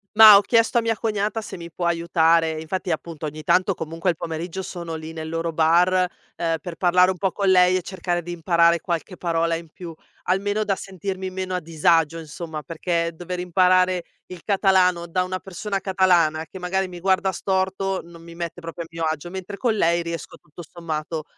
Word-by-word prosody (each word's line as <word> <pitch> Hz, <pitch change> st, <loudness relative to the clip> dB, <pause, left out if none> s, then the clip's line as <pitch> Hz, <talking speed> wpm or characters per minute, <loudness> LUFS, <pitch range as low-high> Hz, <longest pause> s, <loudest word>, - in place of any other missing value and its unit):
Mah, 215 Hz, -2 st, +11 dB
ho -, -, +4 dB
chiesto 230 Hz, +2 st, +2 dB
a -, -, +4 dB
mia 225 Hz, 0 st, 0 dB
cognata 215 Hz, 0 st, -1 dB
se 215 Hz, -, -8 dB
mi 170 Hz, -1 st, -9 dB
può 175 Hz, +1 st, -2 dB
aiutare. 165 Hz, -1 st, +2 dB
E 155 Hz, -, -5 dB
infatti 180 Hz, +3 st, -3 dB
appunto 160 Hz, -1 st, -4 dB
ogni 155 Hz, +1 st, -6 dB
tanto 185 Hz, +5 st, +2 dB
comunque 165 Hz, +2 st, -2 dB
il 170 Hz, -, -6 dB
pomeriggio 165 Hz, +3 st, -5 dB
sono 170 Hz, -3 st, -6 dB
lì 160 Hz, 0 st, -6 dB
nel 160 Hz, -1 st, -6 dB
loro 165 Hz, +1 st, -2 dB
bar, 175 Hz, +3 st, +3 dB, 0.3 s
ehm, 165 Hz, -1 st, -1 dB
per 175 Hz, -2 st, -7 dB
parlare 180 Hz, +1 st, +4 dB
un 185 Hz, -, -2 dB
po' 190 Hz, +2 st, 0 dB
con 200 Hz, -2 st, 0 dB
lei 180 Hz, 0 st, +5 dB
e -, -, -2 dB
cercare 175 Hz, -1 st, -3 dB
di 175 Hz, +1 st, -7 dB
imparare 170 Hz, 0 st, +3 dB
qualche 175 Hz, +1 st, -4 dB
parola 165 Hz, -1 st, 0 dB
in 165 Hz, -1 st, -8 dB
più, 170 Hz, +2 st, -9 dB, 0.3 s
almeno 205 Hz, +3 st, 0 dB
da 200 Hz, -2 st, 0 dB
sentirmi 190 Hz, 0 st, -5 dB
meno 185 Hz, 0 st, -3 dB
a -, -, 0 dB
disagio 165 Hz, 0 st, +2 dB
insomma, 160 Hz, 0 st, -7 dB
perché 170 Hz, +1 st, -2 dB
dover 180 Hz, +1 st, -5 dB
imparare 180 Hz, 0 st, +3 dB, 0.2 s
il 180 Hz, -2 st, -10 dB
catalano 185 Hz, -4 st, +2 dB
da 180 Hz, +2 st, 0 dB
una 185 Hz, 0 st, -4 dB
persona 195 Hz, +2 st, -4 dB
catalana, 180 Hz, -5 st, +2 dB
che 190 Hz, -, -11 dB
magari 190 Hz, +1 st, -1 dB
mi 175 Hz, -1 st, -9 dB
guarda 190 Hz, +1 st, +2 dB
storto, 190 Hz, +1 st, -1 dB
non 170 Hz, -1 st, -14 dB
mi 170 Hz, 0 st, -12 dB
mette 170 Hz, 0 st, -6 dB
proprio 165 Hz, 0 st, -6 dB
a -, -, -11 dB
mio 165 Hz, 0 st, -5 dB
agio, 160 Hz, +3 st, -5 dB
mentre 190 Hz, +1 st, -6 dB
con 235 Hz, -1 st, +1 dB
lei 170 Hz, -3 st, +2 dB
riesco 170 Hz, -2 st, -6 dB
tutto 150 Hz, +3 st, -13 dB
sommato 160 Hz, -2 st, -5 dB
175 Hz, 200 wpm, -23 LUFS, 165-190 Hz, 0.3 s, Mah